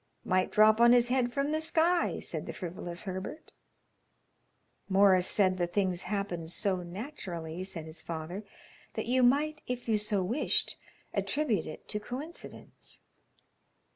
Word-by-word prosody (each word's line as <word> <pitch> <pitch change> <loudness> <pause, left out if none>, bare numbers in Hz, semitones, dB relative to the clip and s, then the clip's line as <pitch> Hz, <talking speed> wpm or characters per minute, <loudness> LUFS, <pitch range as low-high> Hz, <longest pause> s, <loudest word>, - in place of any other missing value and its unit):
"Might 185 0 +2
drop 215 +1 +5
on 235 0 +8
his 245 0 +4
head 250 -1 +2
from 280 +3 0
the 310 0 0
sky," 335 +2 +2
said - - -5
the - - -4
frivolous 175 -1 -6
Herbert. 190 +10 -6 1.4
"Morris 190 -2 +5
said 185 -2 +3
the 175 - +1
things 185 -1 0
happened 195 -6 -2
so 190 +2 0
naturally," 180 - -6
said 170 -4 -6
his 160 +1 -10
father, 170 +5 -5 0.5
"that - - -2
you 255 +2 +2
might 295 +5 +3
if 245 -1 -4
you 220 -2 +3
so 210 -2 +1
wished 235 +11 +1 0.4
attribute 240 - 0
it 155 - -9
to 210 - -1
coincidence." 275 +10 -9
205 Hz, 140 wpm, -30 LUFS, 180-250 Hz, 1.4 s, on